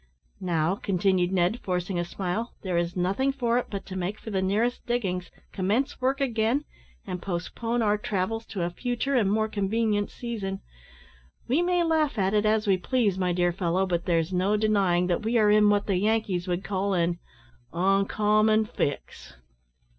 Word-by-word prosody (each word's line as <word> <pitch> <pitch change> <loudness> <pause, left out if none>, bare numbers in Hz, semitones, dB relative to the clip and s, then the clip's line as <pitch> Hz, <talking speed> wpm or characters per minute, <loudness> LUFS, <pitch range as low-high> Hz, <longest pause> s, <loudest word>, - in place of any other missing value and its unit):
"Now," 170 -1 0
continued 185 -2 +1
Ned, 185 +5 +1
forcing 180 0 -2
a - - 0
smile, 195 +6 -3
"there 185 -3 -2
is 170 0 0
nothing 195 +10 +1
for 245 -3 +1
it - - -5
but 200 -2 -5
to 190 - -8
make 190 +3 -3
for 220 - -8
the 190 -2 0
nearest 215 +6 0
diggings, 190 -7 -1 0.2
commence 220 +10 -1
work 265 +2 +1
again, 245 +2 +1 0.4
and 180 - -5
postpone 225 +6 -2
our 210 -1 +2
travels 215 +3 -2
to 190 -4 -3
a 175 - -1
future 245 +7 -2
and 220 -7 +3
more 220 +1 +1
convenient 210 0 0
season. 205 -5 -5 0.9
We 275 +8 +2
may 355 0 +2
laugh 315 -5 +1
at 195 0 +1
it 210 0 +2
as 215 0 +2
we 195 -2 +3
please, 205 -1 0
my 180 -1 +1
dear 175 0 +2
fellow, 180 +1 0
but 175 -2 -1
there's 165 0 +1
no 190 +4 +2
denying 200 -5 +2
that 180 +1 0
we 230 +2 +1
are 210 -2 +4
in 210 0 +5
what 205 -1 +2
the 195 -3 +1
Yankees 205 -3 0
would 180 +1 -1
call 195 0 -1
an 170 0 0 0.5
`oncommon 210 +4 +2
fix.'" 145 - -4
200 Hz, 175 wpm, -26 LUFS, 180-225 Hz, 0.9 s, in